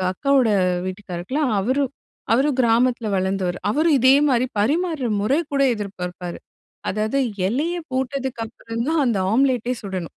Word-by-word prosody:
அ - - -2
அக்காவோட 270 +2 +2 0.4
வீட்டுக்காரருக்கு 185 +3 -6
எல்லாம், 285 -7 +1
அவரு 260 +7 +1 0.5
அவரு 270 +5 +3
கிராமத்துல 235 -1 +2
வளர்ந்தவரு. 190 -1 -1
அவரு 310 +7 +2
இதே 260 +2 +6
மாதிரி 255 -1 +2
பரிமாறுற 310 - 0
முற 215 +6 0 0.2
கூட 275 0 +2
எதிர்ப்பார்ப்பார். 180 -4 -6 0.5
அதாவது 215 +6 0 0.3
இலையப் 325 - -2
போட்டதுக்கு 260 -2 -2
அப்புறம் 230 +1 -5
தான் 320 -2 +2
அந்த 225 -5 +1
ஆம்லெட்டே 250 -1 +2
சுடணும். 185 -4 -5
240 Hz, 135 wpm, -22 LUFS, 200-275 Hz, 0.5 s, இதே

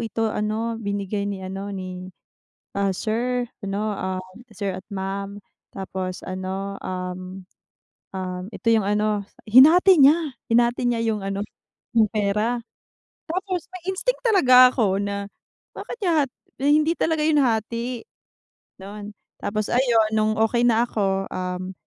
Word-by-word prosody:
ito 225 0 -1
ano 220 +2 -1
binigay 200 -1 -2
ni 200 - -4
ano 195 +2 -5
ni, 185 -1 -6 0.7
ah, 200 -1 +1
sir 240 +5 -1 0.2
'no, 205 +2 -2 0.6
sir 195 -2 -3
at 185 - -8
ma'am," 200 +1 -4 0.3
tapos 185 -1 -5
ano, 190 +1 -4
um, 185 0 -6 0.7
um, 185 -1 -4
ito 235 - -12
yung 220 -1 +4
ano 210 0 +1 0.2
hinati 315 - +7
niya, 280 +3 +8 0.3
hinati 240 +1 +3
niya 235 -1 0
yung 220 -2 0
ano, 195 +1 -3 0.5
yung 220 - +6
pera. 215 +3 0 0.7
Tapos 370 +1 -2
may 370 -2 -9
instinct - - -1
talaga 255 - +7
ako 200 -6 +1
na, 200 0 -3 0.5
bakit - - -7
niya 360 - +2
hat 260 - -17 0.3
hindi 300 +3 +3
talaga 320 -1 +1
yun 305 0 +3
hati, 235 -1 0 0.8
don. 205 +2 -9 0.2
Tapos 210 +1 -2
ayun 235 -4 +3
nung 215 0 +2
okey 230 +2 +2
na 230 -1 +4
ako, 195 -4 -1
um, 185 0 -4
215 Hz, 130 wpm, -23 LUFS, 195-245 Hz, 0.8 s, niya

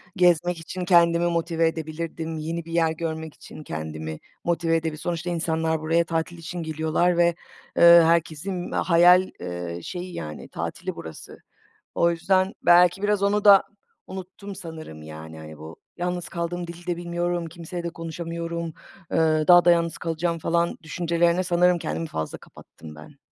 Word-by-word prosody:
gezmek 175 -1 +3
için 180 +3 -6
kendimi 170 -1 +4
motive 165 -1 +1
edebilirdim, 160 0 -4
yeni 165 +2 -4
bir 165 - -10
yer 165 -1 +2
görmek 160 -1 -4
için 155 - -12
kendimi 80 - -6 0.2
motive 170 -1 +1
edebi 160 -1 -2
Sonuçta 175 +2 -3
insanlar 160 -1 0
buraya 165 +2 +2
tatil 165 +1 -2
için 170 +1 -6
geliyorlar 160 +3 0
ve, 175 - +5 0.5
eee, 170 0 +9
herkesin 170 +2 0
hayal, 180 +2 +5
eee, 85 -1 -5
şeyi, 180 0 -6
yani, 75 - -7
tatili - - -5
burası. 80 -1 -10 0.6
O 170 - +3
yüzden, 185 +3 +1
belki 180 +2 +5
biraz 205 -1 +1
onu 205 +1 +1
da 200 -2 +8 0.4
unuttum 190 +1 -8
sanırım, 160 - -9
yani, 80 +1 -10
hani, 80 -1 -10
bu 80 +2 -10 0.2
yalnız 175 -1 -3
kaldım, 175 0 -4
dili 170 +1 -10
de 175 -1 -1
bilmiyorum, 175 0 -2
kimseyle 170 +1 -7
de 170 - -2
konuşamıyorum, 170 0 -5 0.5
eee, 155 -1 +3
daha 175 -1 +8
da 175 - +6
yalnız 170 -1 +1
kalacağım, 165 0 -2
falan, 170 +2 0
düşüncelerine 170 +2 +1
sanırım 180 0 +3
kendimi 165 0 -3
fazla 80 - -5
kapattım 80 -1 -14
ben. 75 0 -14
170 Hz, 150 wpm, -24 LUFS, 160-175 Hz, 0.6 s, eee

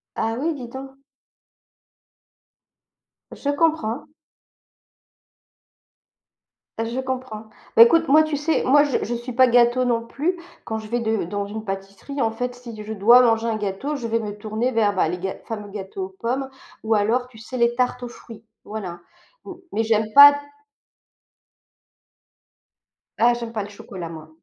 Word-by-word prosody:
Ah 225 0 -1
oui, 320 +4 -1
dis 255 -4 -8
donc. 265 +2 -8 2.4
Je 280 - -5
comprends. 295 -4 0 2.7
Je 230 +3 -2
comprends. 255 -4 -5 0.3
Beh, 230 - +10
écoute, 330 +7 +5
moi, 305 +3 +7
tu 310 -1 -2
sais, 315 +2 0
moi, 285 +3 +5
je 285 - -1
je 240 - -3
suis 240 +2 -6
pas 255 +1 +6
gâteau 240 +1 +4
non 230 -2 0
plus. 330 +9 -2 0.3
Quand 220 -1 -3
je 215 -1 -9
vais 240 +2 -1
de 220 -3 -1
dans 200 +3 -3
une 215 +2 -6
pâtisserie, 195 +7 -5
en 225 - +2
fait, 245 +2 -4
si 245 -2 -10
je 215 +1 -6
dois 235 +5 +6
manger 230 -1 +2
un 225 - 0
gâteau, 210 +8 -3
je 245 -4 -5
vais 230 0 0
me 210 -2 -5
tourner 220 +4 -2
vers, 210 -3 +2
bah, 185 - +2
les 180 - -3
gâ 190 +1 -4
fameux 210 -2 -6
gâteaux 195 -1 -6
aux - - -11
pommes, 260 +3 -2 0.3
ou 225 0 +1
alors, 230 +4 +1
tu 250 - -18
sais, 250 +3 -7
les 235 0 +3
tartes 250 0 -1
aux 245 - -4
fruits. 230 -2 -13 0.2
Voilà. 185 -5 -6 0.5
M 380 - -7 0.2
mais 225 - +1
j'aime 220 -1 +1
pas 285 0 +11 2.8
Ah, 240 +1 +4
j'aime 235 -1 -6
pas 215 -2 -2
le 200 - -7
chocolat, 190 -4 -8
moi. 160 -1 -10
230 Hz, 165 wpm, -22 LUFS, 215-255 Hz, 2.8 s, pas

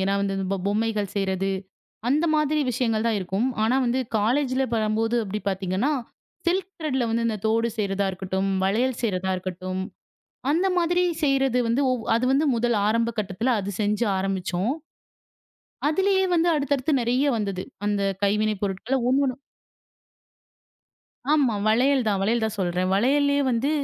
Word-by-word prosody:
என்றால் 200 - +1
இந்த 195 -1 -2
பொம் 190 -1 -3
பொம்மைகள் 210 -1 -1
செய்யறது 195 -1 0 0.6
அந்த 300 +5 +2
மாதிரி 305 0 +2
விஷயங்கள் 225 -2 0
தான் 225 -2 +2
இருக்கும். 190 +6 -1 0.2
ஆனா 240 +4 +2
வந்து 245 +2 +1 0.2
காலேஜில் 255 +3 +1
பண்ணும்போது 225 +1 +1
அப்படி 210 +2 -4
பார்த்தீங்க 190 -1 -2
என்றால் 280 +3 +1 0.5
சில்க் 370 +2 +1
த்ரெட்ல 265 -6 -1
வந்து 230 +1 0
இந்தத் 215 -2 -3
தோடு 230 +1 +2
செய்யறதா 200 -1 0
இருக்கட்டும், 190 +1 -2 0.2
வளையல் 235 +6 +1
செய்யறதா 190 -4 0
இருக்கட்டும் 185 0 -4 0.7
அந்த 345 +6 +2
மாதிரி 350 +1 +2 0.2
செய்யறது 270 -3 +2
வந்து 235 +5 +1 0.3
அது 230 +2 +1
வந்து 285 +3 +3
முதல் 235 -1 +1
ஆரம்ப 230 +2 +2
கட்டத்தில் 205 +4 -1
அது 200 0 -3
செய்ய 210 +2 0 0.2
ஆரம்பித்தோம். 190 +4 -1 1.1
அதிலேயே 380 +4 +2
வந்து 335 +1 +2
அடுத்தடுத்து 285 0 0
நிறைய 250 +4 +1
வந்தது. 195 -3 -3 0.2
அந்தக் 200 -2 0
கைவினை 210 +1 +2
பொருட்களில் 220 +7 -1
ஒன்று 275 +2 +3
ஒன்றாக 255 -1 -2 1.9
ஆமா 280 -7 +3
வளையல் 255 +4 +3
தான், 200 -2 +1
வளையல் 225 +3 +1
தான் 220 -1 -2
சொல்றேன். 180 0 0
வளையலிலே 285 +6 +3
வந்து 245 +5 0
225 Hz, 145 wpm, -24 LUFS, 195-265 Hz, 1.9 s, வந்து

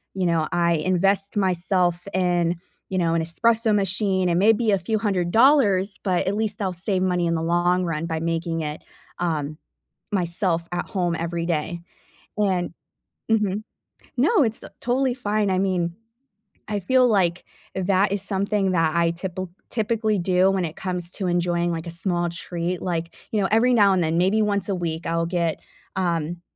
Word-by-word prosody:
you 185 - 0
know, 165 -2 +1
I 170 -1 +2
invest 195 +5 +1
myself 180 -1 +1
in, 175 -2 +2 0.3
you 190 - -2
know, 165 -2 +2
an 165 - +1
espresso 220 +6 +2
machine 190 -1 +1
and 170 +1 +2
maybe 220 +1 +4
a 195 - +3
few 220 +6 -1
hundred 185 -5 0
dollars 220 -7 +4
but 185 -3 +1
at 200 - +1
least 215 0 -2
I'll 185 -1 -1
save 185 +1 -1
money 180 -2 +1
in 170 - +1
the 160 - -1
long 175 +2 +2
run 165 -1 -2
by 160 -1 -2
making 165 0 -2
it, 150 0 -4 0.4
um, 155 -3 -2 0.6
myself 170 -2 0
at 175 0 -2
home 175 -3 -1
every 170 0 -3
day, 170 +1 -2 0.6
and 185 -5 +1 0.6
Mhm. 210 -2 +1 0.6
No, 320 - +4
it's, 225 -2 -1
uh, - - -8
totally 250 +1 +1
fine. 210 -4 0
I 185 - +1
mean, 180 -3 0 0.7
I 210 -1 -1
feel 255 +6 +4
like 185 -6 +1 0.3
that 190 +1 +2
is 200 -1 -1
something 195 -1 0
that 165 -2 +1
I 170 0 +3
typil 185 +1 -5 0.2
typically 220 -2 0
do 185 +1 +3
when 190 -3 0
it 155 - -6
comes 180 -2 -4
to 190 - -3
enjoying, 175 0 +1
like, 165 -1 -4
a - - -5
small 175 0 -1
treat. 170 +1 -4
Like, 170 -2 -3 0.2
you 215 - +1
know, 195 - +2
every 245 +3 +4
now 200 -3 +5
and 180 - +2
then, 160 +1 0
maybe 190 +5 +3
once 205 -1 0
a 195 - +1
week, 165 -2 -3
I'll 165 0 0
get, 170 -2 -1 0.4
um, 170 -2 -1
180 Hz, 180 wpm, -23 LUFS, 170-200 Hz, 0.7 s, now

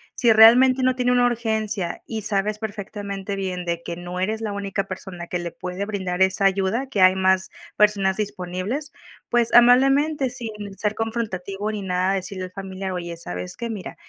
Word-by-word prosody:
Si 235 -3 +4
realmente 250 +4 +7
no 255 0 +3
tiene 250 -1 +1
una 245 0 +4
urgencia, 220 -6 -2
y 220 -3 -4
sabes 210 +1 -1
perfectamente 200 -2 -5
bien 185 -2 -3
de 170 0 -3
que 170 - -5
no 175 +1 -6
eres 215 +4 -1
la 215 -2 -3
única 200 0 -2
persona 185 -2 -8
que 180 - -3
le 170 -1 -5
puede 180 +2 -5
brindar 190 -3 -3
esa 190 +1 +3
ayuda, 195 +7 +1
que 205 -7 -1
hay 185 0 +7
más 190 0 +2 0.3
personas 200 -2 +3
disponibles, 205 +8 -3 0.4
pues, 240 -1 +1
amablemente, 270 +4 +5
sin 240 -2 -5 0.3
ser 210 0 -1
confrontativo 215 -3 -3
ni 210 -2 -4
nada, 185 +1 0
decirle 185 0 -4
al 185 - -11
familiar: 190 0 -6
"Oye, 170 -1 -5
¿sabes 90 - -6
qué? 235 - -4
Mira, 210 -4 -6
200 Hz, 180 wpm, -23 LUFS, 185-225 Hz, 0.4 s, realmente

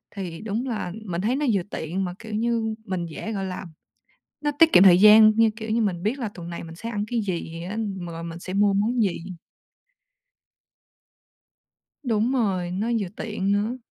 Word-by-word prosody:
Thì 180 -4 -6
đúng 220 +4 -3
là, 215 -6 -3
mình 180 -2 -3
thấy 235 +5 +1
nó 295 - -1
vừa 195 - +2
tiện, 175 +5 -3
mà, 180 - -4
kiểu 225 -2 -8
như, 225 0 0
mình 185 -2 -3
dễ, 170 +7 -6
gọi 195 -2 -3
là 185 0 -5 0.8
nó 295 0 0
tiết 325 -1 +6
kiệm 180 - +8
thời 180 -3 +8
gian 215 +1 +9
như, 225 -1 +5
kiểu 220 -1 -7
như, 230 +1 +2
mình 180 -4 -1
biết 235 +7 -1
là 235 -4 -2
tuần 170 -1 -8
này 170 - -6
mình 165 0 -10
sẽ 225 +7 -6
ăn 205 -3 -2
cái 235 0 -1
gì 170 -4 -4
ăn, 210 -1 -3
rồi 165 -1 -7
mình 170 0 -7
sẽ 185 +1 -7
mua 200 0 +3
món 225 +5 +1
gì. 190 -4 0 2.9
Đúng 230 -1 +1
rồi, 190 -8 0
nó 200 +5 -2
vừa 200 - -2
tiện 205 -3 -2
nữa. 210 +5 0
205 Hz, 200 wpm, -24 LUFS, 180-225 Hz, 2.9 s, gian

